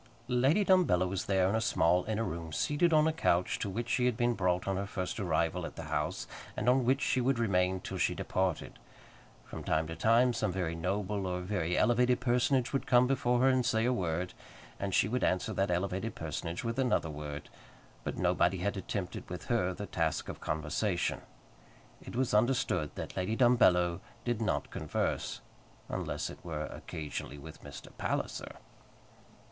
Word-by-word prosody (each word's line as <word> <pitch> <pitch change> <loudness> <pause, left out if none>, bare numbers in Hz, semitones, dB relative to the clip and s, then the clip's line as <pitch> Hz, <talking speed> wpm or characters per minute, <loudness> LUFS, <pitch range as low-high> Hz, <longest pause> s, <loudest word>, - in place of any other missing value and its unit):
Lady 135 +11 +3
Dumbello 175 - +4
was 95 0 -3
there 95 -2 +3
in 95 - 0
a 110 - +1
small 90 -6 +2
inner 110 0 -1
room, 85 -5 -4
seated 150 - +1
on 155 0 +5
a 160 - +1
couch 90 - +1
to 100 - -2
which 115 +5 -3
she 125 +1 +2
had 120 -3 0
been 120 -1 +2
brought 90 -3 0
on 95 - +1
her 100 +1 -2
first 95 -2 -3
arrival - - 0
at - - -6
the - - -6
house, - - -1 0.3
and 110 - -2
on 125 0 +4
which 135 +3 +2
she 130 - +2
would 130 +1 +2
remain 95 -4 +2
till - - -6
she - - +1
departed. 95 -3 -2 0.7
From - - -8
time 80 +1 +1
to 80 +1 -6
time 120 +5 +4
some 110 -4 0
very 90 -3 -2
noble 95 +3 -2
or 90 0 -2
very 90 -2 -1
elevated 125 +1 +3
personage 125 +1 +2
would 135 - -1
come 125 0 +6
before 125 -2 +1
her 130 - +5
and 130 -1 +3
say 115 -1 +1
a 125 - +3
word, 90 -3 -2 0.5
and 100 0 -2
she 95 - +3
would 125 +4 -1
answer 90 0 +1
that 95 0 0
elevated 95 +5 -1
personage 80 +2 -4
with 115 +2 -2
another 125 -11 +1
word; 75 -1 -6 0.6
but - - -4
nobody 90 +2 +2
had 100 +4 -1
attempted 95 -1 -4
with 90 0 -6
her 110 -7 +2
the 105 +3 -5
task 80 -5 -1
of - - -7
conversation. 80 +5 -1 0.8
It - - -9
was 130 -2 0
understood 105 - +2
that - - -6
Lady 95 +4 -1
Dumbello 90 -8 +4 0.3
did 120 -2 -1
not 110 - -1
converse, - - -2 0.5
unless - - -3
it - - -13
were 80 -3 -3
occasionally 75 -1 -6
with 80 +3 -11
Mr. - - -11
Palliser. - - -3
100 Hz, 185 wpm, -31 LUFS, 90-120 Hz, 0.8 s, come